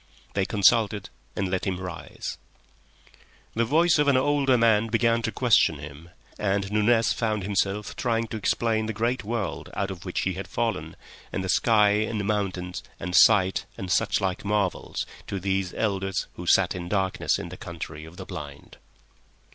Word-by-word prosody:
They 95 -1 +1
consulted 105 0 +3 0.2
and 95 - -1
let 95 +1 -2
him 90 -1 -1
rise. 90 -2 -6 1.1
The 115 +1 +1
voice 160 +5 +3
of 150 - +3
an 140 -2 +5
older 135 -1 +3
man 115 -1 +4
began 115 +1 +2
to 110 - -2
question 110 - +3
him, 75 +3 -10 0.3
and 100 -1 0
Nunez 110 +2 +3
found 110 -3 -1
himself 100 +1 -1
trying 115 0 0
to 110 - -4
explain 110 +1 0
the 110 - -2
great 120 +2 0
world 110 -1 -3
out 100 0 -1
of 90 -1 -8
which 90 - -2
he 95 - 0
had 95 +1 -6
fallen, 95 -7 -2 0.4
and 95 - -2
the 95 - -4
sky 105 0 +4
and 105 0 0
mountains 95 -4 -2 0.2
and 90 - -5
such 95 0 +3
like 95 -2 -2
marvels, 100 -2 -1 0.2
to 100 - -3
these 95 -1 -1
elders 95 -3 -1
who - - -8
sat - - +4
in 90 -1 -6
darkness 95 -1 0
in - - -6
the - - -8
Country 80 -2 -7
of 80 +2 -12
the 95 - -7
Blind. 70 -4 -9
100 Hz, 165 wpm, -26 LUFS, 95-115 Hz, 1.1 s, an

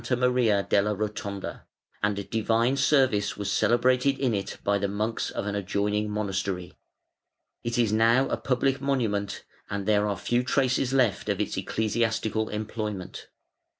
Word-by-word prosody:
Maria 125 -5 +2
della 105 +1 +2
Rotonda, 100 -1 -5 0.3
and 100 -1 -1
divine 115 +3 +2
service 135 -7 +2
was 100 -1 -2
celebrated 125 +3 +3
in 130 -4 +1
it 100 -2 -3
by 100 0 +2
the 100 - 0
monks 105 +3 -2
of - - -4
an 105 - -2
adjoining 105 +1 -1
monastery. 95 -3 -3 0.9
It 120 0 -2
is 115 -3 +2
now 115 +4 +4
a - - 0
"public 135 +1 0
monument" 110 -8 -1 0.3
and 100 -1 -3
there 105 0 +3
are 100 -2 -1
few 120 +6 +1
traces 130 0 +1
left 125 -7 +1
of 100 -1 0
its 105 - -1
ecclesiastical 110 +2 -1
employment. 105 -2 -5
110 Hz, 145 wpm, -27 LUFS, 100-120 Hz, 0.9 s, now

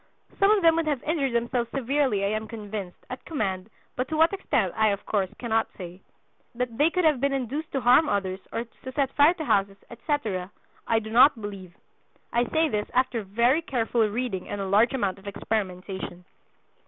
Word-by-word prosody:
Some 395 - +5
of 420 -3 +4
them 330 -1 +6
would 330 -1 0
have 290 -4 -1
injured 290 -5 0
themselves 235 0 0
severely, 265 -6 0
I - - +1
am 215 +1 -2
convinced, 210 -4 -6
at 255 - -6
command, 195 - -3 0.3
but 255 +1 -2
to 315 - -2
what 325 +4 +4
extent 220 - 0
I 220 0 +3
of 200 -1 -1
course 195 -3 0
cannot 225 -2 0
say. 180 0 -9 0.5
That 245 -1 -3
they 300 +3 +5
could 365 0 0
have 300 -5 +3
been 280 0 +1
induced 275 +5 -3
to 270 - 0
harm 250 +6 +5
others, 190 -2 -1
or 230 - -2
to 250 +3 -11
set 275 -1 0
fire 300 +5 +5
to 320 -4 -5
houses, 195 -3 +1
etc., 225 - -2 0.4
I 225 - +3
do 220 0 -4
not 245 +2 +6
believe. 195 -3 -8 0.6
I 240 +1 +2
say 320 0 +2
this 210 -7 -2
after 250 -2 +1
very 235 - +2
careful 240 -6 -1
reading 225 -4 -3
and 205 - -4
a 195 - -2
large 210 +6 +3
amount 200 -6 -1
of 195 - -14
experimentation." 190 -3 -4
230 Hz, 195 wpm, -26 LUFS, 200-275 Hz, 0.6 s, them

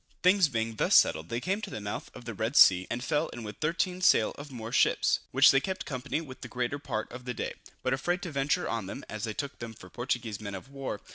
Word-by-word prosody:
Things 185 -2 +5
being 115 -3 -2
thus - - +3
settled, 80 +1 +4
they 115 - -1
came 190 - -1
to - - -5
the - - -5
mouth 105 0 -5
of 120 - -10
the 115 - -4
Red 110 +6 -2
Sea, 90 -7 +7
and 120 +1 -3
fell 150 +4 +1
in 120 - -8
with 105 -2 -7
13 180 +3 -1
sail 115 -11 +5
of 145 0 -10
Moor 115 -2 -6
ships, - - +3
which - - +7
they 135 - +4
kept 190 +6 -4
company 140 +3 -3
with 130 -4 -10
the - - -6
greater 125 +3 -2
part 110 -6 -4
of 125 +1 -9
the 125 -1 -3
day, - - -3 0.3
but 130 - +1
afraid 175 +8 -1
to 175 - -4
venture 145 +5 0
on 115 -5 -2
them, - - -7
as 110 +1 -4
they 110 - -3
took 140 -1 -5
them 115 -1 -7
for 90 -3 -14
Portuguese 120 -4 -3
men 100 -2 -5
of 95 +8 -9
war. 135 -6 -5
125 Hz, 260 wpm, -29 LUFS, 110-145 Hz, 0.3 s, Sea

